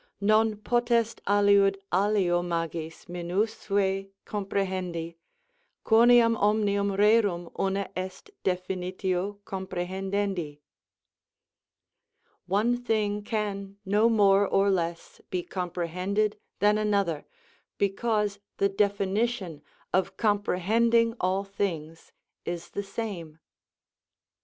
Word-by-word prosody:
Non 215 +2 +3
potest 235 0 +1
aliud 200 -1 +4 0.2
alio 190 -2 +2
magis 165 -2 -4
minusve 195 +2 -1 0.2
comprehendi, 185 -4 -3 0.7
quoniam 230 0 +6
omnium 200 -1 +2
rerum 205 -5 +3
una 195 0 0
est 185 0 -6
dejinitio 185 +1 -2
comprehendendi: 190 -3 -3 1.9
"One 215 +6 +2
thing 215 -4 0
can 200 -2 -3
no 210 +4 +3
more 200 -3 +4
or 195 +1 +3
less 170 -2 -3
be 180 -1 -2
comprehended 185 +4 -2 0.2
than 210 +1 +3
another, 200 -7 0 0.5
because 205 0 0 0.2
the 200 - +2
definition 200 -3 0 0.3
of 185 +1 0
comprehending 225 +3 +2
all 185 +2 +1
things 165 -5 -4 0.3
is 175 0 -5
the 200 - -3
same." 195 -7 -6
200 Hz, 85 wpm, -27 LUFS, 180-210 Hz, 1.9 s, quoniam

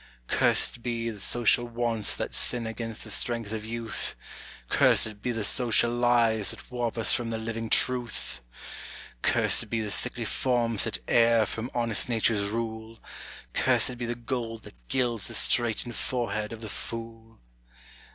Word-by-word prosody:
Cursed 120 - +3
be 115 -1 -2
the 105 - -10
social 120 +4 +2
wants 115 -3 0
that - - -4
sin 120 -2 -1
against 115 0 -5
the - - -7
strength 115 -3 -1
of 110 -1 -4
youth! 115 +1 -4 0.5
Cursed 105 - +3
be 125 - -1
the 115 -2 -3
social 120 +1 +3
lies 120 -3 +2
that - - -8
warp 120 -2 -2
us 115 - +4
from 120 -1 -1
the 115 - -2
living 115 0 -4
truth! 120 - 0 0.8
Cursed - - +3
be 115 - -1
the 105 -2 -3
sickly 120 +2 -1
forms 115 -4 0
that - - -1
err 115 -1 +4
from 115 +4 -5
honest 115 0 +2
nature's 110 -3 +2
rule 110 +1 -4 0.6
Cursed 125 - +2
be 120 - -3
the 120 - -2
gold 115 -2 -4
that - - -16
gilds 120 -5 0
the - - -3
straitened 120 0 +2
forehead 110 -4 -2
of 115 -1 -8
the 110 - -6
fool! 115 +1 -8
115 Hz, 155 wpm, -27 LUFS, 110-120 Hz, 0.8 s, us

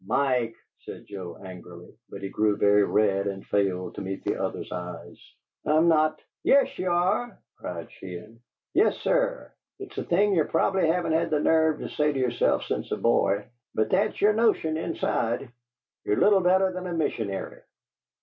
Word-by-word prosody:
"Mike!" 125 -5 +1 0.2
said - - -10
Joe, 95 -4 -8
angrily, 90 -1 -11 0.2
but 100 - -9
he 100 - -3
grew 105 0 +1
very 105 0 +4
red 100 -1 +1
and 95 -1 -5
failed 95 -3 -1
to - - -7
meet 95 0 -5
the - - -1
other's - - -4
eye, 90 -1 -7 0.5
"I'm 155 +3 +3
not 155 -1 +3
" - - -67
"Yes, 280 - +3
ye 185 - -2
are!" 185 +6 0 0.2
cried 85 -2 -7
Sheehan. 95 +5 -10 0.3
"Yes, 400 - +3
sir! - - 0 0.2
It's 395 -1 -8
a - - -2
thing 200 +4 +2
ye 170 - +3
prob'ly 190 +2 +1
haven't 165 0 +1
had 165 +1 +1
the 150 - +1
nerve 160 0 +3
to - - -5
say 150 0 +1
to 135 - -2
yerself 125 -2 +1
since 65 - -4
a - - 0
boy, 100 +1 +2 0.3
but 110 0 0
that's 210 +2 +1
yer 210 +1 +4
notion 215 -8 +2
inside: 125 -6 -2 0.5
ye're 105 - +1
little 205 -2 +5
better 185 +1 +3
than 185 0 -5
a 175 - -4
missionary! 110 - -3
145 Hz, 175 wpm, -26 LUFS, -, 0.5 s, little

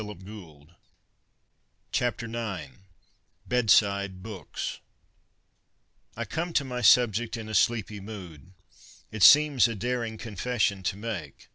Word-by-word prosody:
IX 105 -4 -9 1.7
BEDSIDE 120 -2 -1
BOOKS 110 -8 -4
IX 70 - -14 0.8
BEDSIDE 100 -5 +2
BOOKS 105 -4 -6 1.4
I - - -3
come 170 +1 -4
to 145 - +2
my 125 -1 -4
subject 115 0 +4
in 110 -1 -7
a 110 - -7
sleepy 110 0 +1
mood. 95 -5 -10 0.6
It 110 - -6
seems 145 -2 +7
a 115 - -4
daring 115 0 -3
confession 110 -2 -1
to 95 +1 -2
make. 100 -10 -7
110 Hz, 115 wpm, -27 LUFS, 100-120 Hz, 1.7 s, seems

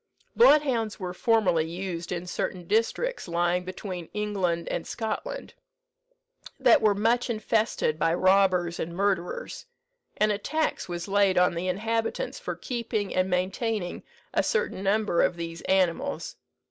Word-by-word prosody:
"Bloodhounds 275 - +4
were 180 -2 -4
formerly 185 -6 +2
used 175 -1 -5
in 175 0 -3
certain 180 0 -3
districts 230 - 0
lying 175 +1 +1
between 185 -2 -6
England 190 -5 -1
and 170 - -3
Scotland, 225 - -4 1.1
that 315 - +5
were 210 -2 +4
much 235 +4 +1
infested 215 -7 0
by 165 - +2
robbers 185 -2 +3
and 170 +1 -4
murderers; 190 -2 -2 0.5
and 215 0 +3
a 205 - -1
tax 315 -3 -1
was 175 +1 -4
laid 200 -1 +3
on 180 0 +4
the 170 +2 -3
inhabitants 225 - -2
for - - -4
keeping 230 -5 -3
and 185 0 +1
maintaining 185 +1 -1 0.3
a - - +3
certain 465 - -1
number 200 -2 +2
of - - +2
these 165 0 -6
animals. 195 - 0
195 Hz, 135 wpm, -27 LUFS, 175-225 Hz, 1.1 s, that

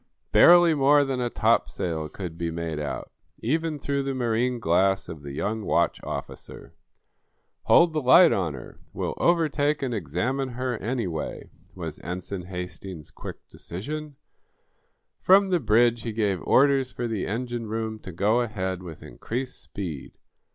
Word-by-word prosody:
Barely 175 -1 +7
more 145 0 +4
than 130 -2 -2
a 120 - 0
topsail 90 -9 0
could 90 -2 -7
be 85 0 -3
made 80 -2 -4
out, 75 - -5 0.3
even 160 +5 -1
through 140 -1 -1
the 135 -1 -3
marine 120 0 0
glass 95 0 +2
of 80 -3 -8
the 70 -1 -8
young 105 +9 -2
watch - - +1
officer. - - -7 0.9
"Hold 170 -1 +5
the 155 - 0
light 165 +7 +7
on 85 -7 -1
her; 65 - -11
we'll - - -3
overtake 150 -4 +1
and 130 -2 -1
examine 115 - -2
her, 125 0 -2
anyway," 105 -9 -4 0.2
was 80 -4 -6
Ensign 90 +1 -6
Hastings's 90 -4 -7
quick - - -10
decision. 145 - -7 1.0
From 195 +1 +5
the 180 - +3
bridge 115 -1 +3
he 115 -1 -4
gave 105 -4 0
orders 135 -1 +4
for 120 - -3
the 110 -4 -2
engine 120 +1 -3
room 110 0 -3
to 95 - -9
go 105 +7 +2
ahead 95 -5 -3
with 85 -4 -10
increased 125 +3 -5
speed. 85 -9 -7
110 Hz, 150 wpm, -25 LUFS, 90-135 Hz, 1.0 s, Barely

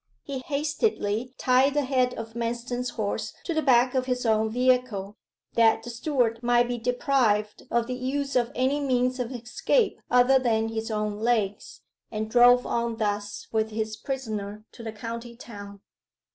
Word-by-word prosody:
He 275 -2 -5
hastily 275 - -1
tied 265 +2 +3
the 295 - +2
head 255 -2 +1
of 225 0 -7
Manston's 240 +2 -3
horse 210 -3 -3
to 340 - -2
the 315 - +1
back 250 -3 +4
of 260 -1 0
his 250 -1 -1
own 220 -1 +2
vehicle, 245 -4 +1 0.4
that 225 -1 +4
the 240 - -6
steward 235 -2 0
might 240 0 +3
be 245 -1 -3
deprived 230 -4 +1
of 235 0 +1
the 255 - -4
use 275 +2 -2
of 240 -2 +2
any 265 +3 +1
means 255 -2 +1
of 250 0 -2
escape 250 - 0
other 250 +2 +5
than 225 -3 +1
his 225 0 -4
own 210 -1 -2
legs, 215 -3 -1 0.3
and 215 0 -4
drove 245 +1 +6
on 235 -1 -1
thus 205 -1 -2
with 220 -1 0
his 220 0 -3
prisoner 215 -6 -5
to - - -12
the 225 -1 -5
county 230 +2 -7
town. 200 -4 -10
240 Hz, 165 wpm, -26 LUFS, 220-255 Hz, 0.4 s, drove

